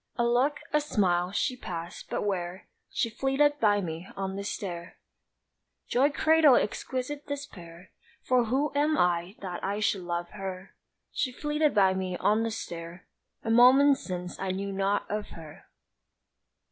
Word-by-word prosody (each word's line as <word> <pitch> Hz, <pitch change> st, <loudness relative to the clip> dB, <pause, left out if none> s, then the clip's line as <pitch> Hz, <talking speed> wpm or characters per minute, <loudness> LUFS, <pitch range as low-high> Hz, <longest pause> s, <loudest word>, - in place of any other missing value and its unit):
A 235 Hz, -, +1 dB
look, 250 Hz, +5 st, +2 dB
a 300 Hz, -, +4 dB
smile 180 Hz, -10 st, +1 dB
she 250 Hz, +5 st, 0 dB
passed! 170 Hz, -8 st, -7 dB
but -, -, -2 dB
where 185 Hz, -2 st, -3 dB, 0.2 s
She -, -, 0 dB
flitted 270 Hz, +5 st, +1 dB
by 205 Hz, -3 st, +3 dB
me 165 Hz, 0 st, -5 dB
on 190 Hz, 0 st, -3 dB
the 200 Hz, -, -4 dB
stair 175 Hz, -4 st, -5 dB, 0.9 s
Joy 270 Hz, +4 st, +3 dB
cradled 310 Hz, -3 st, +5 dB
exquisite 260 Hz, +7 st, -4 dB
despair; 185 Hz, -, -8 dB, 0.3 s
For 250 Hz, -2 st, +3 dB
who 270 Hz, +6 st, 0 dB
am 300 Hz, +2 st, +2 dB
I 175 Hz, +2 st, +1 dB
that 180 Hz, -2 st, -5 dB
I 200 Hz, +2 st, -1 dB
should 205 Hz, -2 st, +1 dB
love 175 Hz, 0 st, -3 dB
her? 190 Hz, -2 st, -7 dB, 0.4 s
She 255 Hz, -, -1 dB
flitted 295 Hz, +2 st, 0 dB
by 190 Hz, -2 st, +5 dB
me 185 Hz, -1 st, -3 dB
on 215 Hz, +4 st, +2 dB
the 230 Hz, -, 0 dB
stair 170 Hz, -5 st, -7 dB, 0.4 s
A 225 Hz, -, -1 dB
moment 265 Hz, +4 st, +6 dB
since 180 Hz, -1 st, -6 dB
I 190 Hz, -, -2 dB
knew 195 Hz, +2 st, -3 dB
not 195 Hz, +1 st, 0 dB
of 210 Hz, 0 st, -3 dB
her! 155 Hz, -2 st, -12 dB
205 Hz, 155 wpm, -28 LUFS, 180-260 Hz, 0.9 s, moment